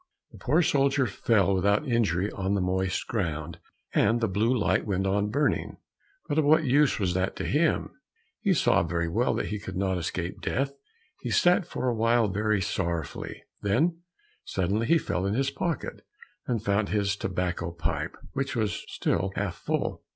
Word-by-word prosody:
The - - -14
poor 155 +7 +3
soldier 140 -2 +2
fell 100 -5 +2
without 100 +8 +2
injury 105 -5 +1
on 95 +1 -1
the - - +1
moist 95 +1 0
ground, 80 -9 -3 0.3
and 115 +1 +3
the 115 - +1
blue 105 +5 +1
light 115 -3 +1
went 95 -1 0
on 100 +2 +1
burning, 145 +6 0 0.5
but 150 0 +1
of - - +3
what 155 +3 +5
use 140 +1 +3
was 95 -4 0
that 95 +1 -1
to - - -4
him? 155 +3 +1 0.5
He 195 -4 +2
saw - - +3
very 85 0 -1
well 115 +9 +1
that - - -2
he 105 - -3
could 100 - -6
not 95 -1 0
escape 85 +2 -4
death. 135 +2 -1 0.5
He - - -5
sat 175 0 +3
for 130 - -3
a 125 - +2
while 115 0 +3
very 105 +1 0
sorrowfully, 85 -6 -3 0.2
then 160 - +1 0.4
suddenly 100 +5 -1
he 170 - +5
felt 95 - -1
in 100 - 0
his 135 +2 +1
pocket 160 +2 -3 0.4
and 115 -3 -1
found 100 +1 +1
his 100 -2 +1
tobacco 90 -3 -2
pipe, 85 -3 -3 0.2
which 135 -1 -2
was 110 -3 -1
still 95 +3 -1
half 100 -3 -1
full. - - -2
105 Hz, 175 wpm, -27 LUFS, 95-130 Hz, 0.5 s, what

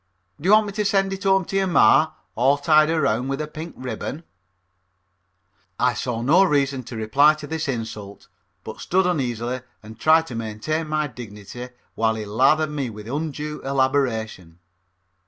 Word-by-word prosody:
Do 175 - -1
you - - +7
want 215 0 +6
me 205 - -5
to 210 +1 -1
send 195 -1 +1
it 195 +1 -7
home 190 -1 +3
to 195 - -6
your 195 0 +2
ma, 160 -2 +4 0.2
all 135 +5 +3
tied 155 +1 +4
around 135 -7 +1
with 135 +1 -2
a 155 - -2
pink 155 +2 -9
ribbon?" 130 +5 -5 1.6
I 125 0 +3
saw 120 -2 -3
no 165 +9 +5
reason 140 -6 +1
to 120 - -8
reply 135 +8 +4
to 155 -1 -9
this 160 +1 -4
insult, 110 -5 -6 0.4
but - - -9
stood 190 +1 +1
uneasily 125 -7 -2 0.2
and 110 +1 -12
tried 160 +3 +4
to 130 - -9
maintain 115 +9 -3
my 155 0 0
dignity 120 -1 -9 0.2
while 110 0 +1
he 110 -1 -5
lathered 135 +9 +2
me 140 -4 -3
with 105 -1 -10
undue 150 +2 -4
elaboration. 125 -10 -1
140 Hz, 170 wpm, -22 LUFS, 115-155 Hz, 1.6 s, you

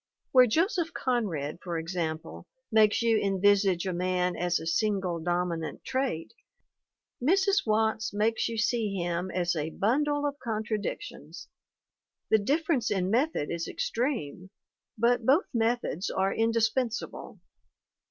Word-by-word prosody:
Where 255 -1 +7
Joseph 335 - 0
Conrad, 180 - -1
for 175 -2 -3
example, 160 - -4 0.2
makes 215 0 +4
you 225 -2 +3
envisage 195 -2 +2
a 185 - -1
man 180 0 0
as 175 0 0
a - - -7
single 190 -1 0
dominant 175 -1 -2
trait, 260 -11 -2 0.9
Mrs. 390 - +2
Watts 220 0 +1
makes 220 +3 0
you 230 - -4
see 220 -2 0
him 175 0 -2
as 175 -1 0
a 155 0 -2
bundle 290 - +1
of 285 0 -3
contradictions. 215 -3 -5 0.8
The 220 - +6
difference 285 +2 +1
in 190 -2 0
method 245 - 0
is 170 -1 -3
extreme, 225 - -3 0.5
but 235 +2 +2
both 275 - +4
methods 230 -6 0
are 190 +1 0
indispensable. 230 +1 -1
215 Hz, 125 wpm, -28 LUFS, 180-245 Hz, 0.9 s, Where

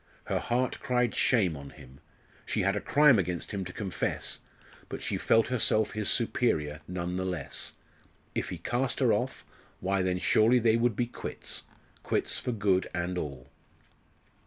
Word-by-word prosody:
Her - - -1
heart 125 +2 0
cried 125 -2 +1
shame 100 - +3
on 70 -1 -8
him. 65 +2 -15 0.4
She - - -1
had 100 +2 +2
a 105 - -1
crime 145 -6 +5
against 90 -2 -2
him 100 -3 -2
to 90 - -6
confess 95 -1 -3 0.5
but - - -5
she - - -1
felt 115 0 +3
herself 110 -3 +2
his 105 -1 -1
superior 75 -11 +1
none 90 0 -3
the 95 - -1
less. 80 -7 -4 0.6
If - - -2
he 90 - -4
cast 120 +9 -1
her 125 -5 +4
off 125 +5 -2 0.3
why 95 +1 +1
then 90 0 +1
surely 110 +6 +4
they 115 -2 +4
would 115 -1 +2
be 120 - +1
quits, 120 - -6 0.4
quits - - 0
for 125 - -2
good 100 -4 +1
and 85 +1 -1
all. 70 -5 -5
100 Hz, 165 wpm, -29 LUFS, 90-120 Hz, 0.6 s, crime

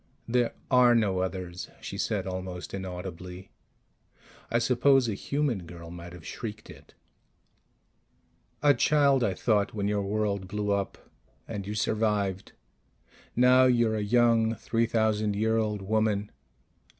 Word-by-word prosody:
"There 120 0 +1 0.2
are 125 -2 +6
no 100 -5 +2
others," 90 -1 -4
she - - -7
said - - -1
almost 95 -1 -6
inaudibly. 90 -1 -7 1.0
I 115 - +2
suppose 125 +2 +3
a 110 - -1
human 120 - -2
girl 85 -1 -10
might 85 0 -9
have 90 -3 -12
shrieked 110 -1 -7
it. - - -17 1.7
A 145 -1 +6
child, 140 -3 +3
I 95 -5 0
thought, 105 0 +1
_when 100 -2 -2
your 105 0 0
world 100 -1 -1
blew 105 +1 -2
up. 100 -1 -1 0.5
And 100 -4 -5
you 105 - -4
survived. 105 -3 -1 0.8
Now 125 +1 +6
you're 120 -3 +3
a 105 - -1
young 115 +1 +3
three 115 +2 0
thousand 110 -2 +1
year 110 +2 +1
old 105 -3 -1
woman 105 0 0
105 Hz, 135 wpm, -28 LUFS, 95-115 Hz, 1.7 s, are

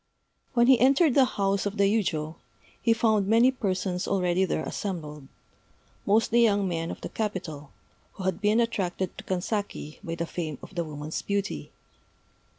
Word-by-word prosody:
When 235 -1 +5
he 255 -1 +6
entered 275 +4 +4
the 270 0 +6
house 195 0 +1
of 205 +2 -5
the 200 - +3
yujô, 175 -7 0 0.4
he 230 - +3
found 220 -3 +2
many 230 +4 +5
persons 190 -6 -2
already 185 -1 +2
there 155 - -1
assembled 150 -8 -5 0.8
mostly 225 +3 +4
young 205 -4 +3
men 165 -2 -2
of - - -7
the - - -5
capital, 175 -9 -4 0.4
who 190 - -8
had 190 +2 -1
been 210 +2 +3
attracted 190 -6 -1
to - - -8
Kanzaki 185 -4 -3
by 165 - -4
the 170 0 -2
fame 160 -4 -4
of - - -11
the 170 -2 -1
woman's 150 0 -5
beauty. 200 0 -3
195 Hz, 160 wpm, -27 LUFS, 170-220 Hz, 0.8 s, he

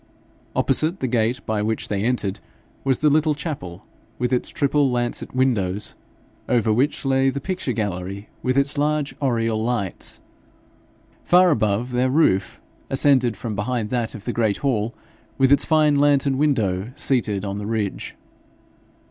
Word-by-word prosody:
Opposite 165 +5 +2
the - - -2
gate 120 +2 0
by 110 -1 -1
which 110 +1 -2
they 100 -1 -2
entered 110 -4 -1 0.4
was 135 -1 +2
the 150 - +3
little 155 0 +2
chapel, 105 - -6 0.3
with 125 0 -1
its 125 - 0
triple 140 -1 +1
lancet 120 0 -2
windows, 105 -7 0 0.6
over 115 -3 +2
which 135 +5 0
lay 135 0 +3
the 135 +1 -3
picture 180 -2 -3
gallery 100 -2 -4
with 130 +1 0
its 140 +1 +1
large 150 -1 0
oriel 115 -4 0
lights. 115 -6 -2 1.0
Far 180 0 +5
above 110 -2 0
their 125 +1 +1
roof, 130 -10 +2 0.3
ascended 130 -5 +3
from 110 -1 -4
behind 110 0 -2
that 120 -3 -1
of 110 0 -10
the 120 - -2
great 110 -3 +1
hall, 115 -3 0 0.4
with 135 0 +3
its 140 - +5
fine 155 -2 +3
lantern 140 -2 +3
window 110 -8 0
seated 105 -9 0
on 100 0 -4
the 105 - -5
ridge. 110 -3 -3
125 Hz, 150 wpm, -22 LUFS, 105-140 Hz, 1.0 s, Far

